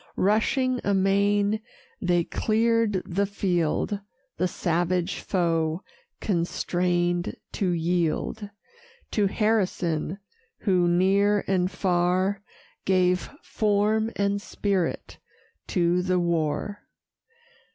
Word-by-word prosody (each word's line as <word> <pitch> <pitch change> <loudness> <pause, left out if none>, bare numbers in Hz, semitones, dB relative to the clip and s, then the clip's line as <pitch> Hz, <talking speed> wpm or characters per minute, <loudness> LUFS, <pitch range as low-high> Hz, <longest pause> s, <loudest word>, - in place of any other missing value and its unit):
Rushing 250 +6 +2
amain, 200 +2 +2 0.4
they 175 -2 +2
clear'd 225 -1 +1
the 195 +3 0
field, 190 0 0 0.4
The 185 - +1
savage 175 +1 -1
foe 165 -2 0 0.4
constrain'd 175 -1 0 0.2
to 195 - -1
yield 175 +5 -1 0.6
To 205 -2 +2
Harrison, 190 -6 0 0.4
who, 180 -4 +2
near 195 +4 +3
and 185 -2 +1
far, 185 +1 +1 0.4
Gave 180 -1 +2
form 215 +1 +1
and 200 0 0
spirit 195 -4 -2 0.5
to 175 0 +2
the 185 0 +1
war. 170 +4 -1
185 Hz, 85 wpm, -26 LUFS, 175-205 Hz, 0.6 s, near